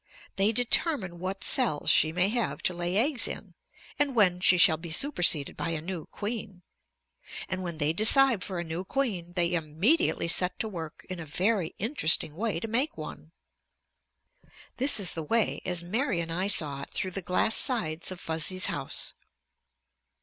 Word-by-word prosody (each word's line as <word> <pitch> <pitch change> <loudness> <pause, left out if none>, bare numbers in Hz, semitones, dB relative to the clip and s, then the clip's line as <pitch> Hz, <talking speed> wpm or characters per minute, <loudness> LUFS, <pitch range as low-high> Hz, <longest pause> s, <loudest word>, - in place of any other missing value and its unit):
They 195 +2 +2
determine 230 - +1
what 190 +2 -5
cells 235 - +2
she 155 - +3
may 180 +3 +2
have 235 +1 -2
to 180 - 0
lay 175 +2 -2
eggs 255 +2 +2
in - - -8 0.5
and 285 -3 0
when 185 -5 +3
she 180 0 +4
shall 160 -2 +4
be 165 +2 -9
superseded 175 - +1
by 165 - -4
a 165 -2 -3
new 170 0 -7
queen. 205 -4 -7 0.8
And 185 - -4
when 170 -3 -6
they 150 0 0
decide 230 +2 +4
for 185 - -6
a 170 - -3
new 165 +2 -5
queen, 190 -8 -3
they 175 -1 0
immediately 175 - 0
set 180 +2 0
to 220 - -3
work 165 -6 -8
in 185 -1 -7
a 165 - -7
very 185 +2 -1
interesting 185 - +1
way 210 -2 -2
to 225 - -6
make 260 +9 -1
one. - - -10 1.5
This 265 -2 +7
is 195 - +3
the 165 - -5
way, 220 +8 0
as 180 -2 -1
Mary 215 +2 -1
and 165 -1 -3
I 185 +4 -2
saw 145 -8 +3
it - - -9
through 185 - -3
the 195 - -5
glass 180 +5 +1
sides 175 - +1
of 185 - -8
Fuzzy's 165 +4 +1
house. - - -3
185 Hz, 175 wpm, -27 LUFS, 170-225 Hz, 1.5 s, This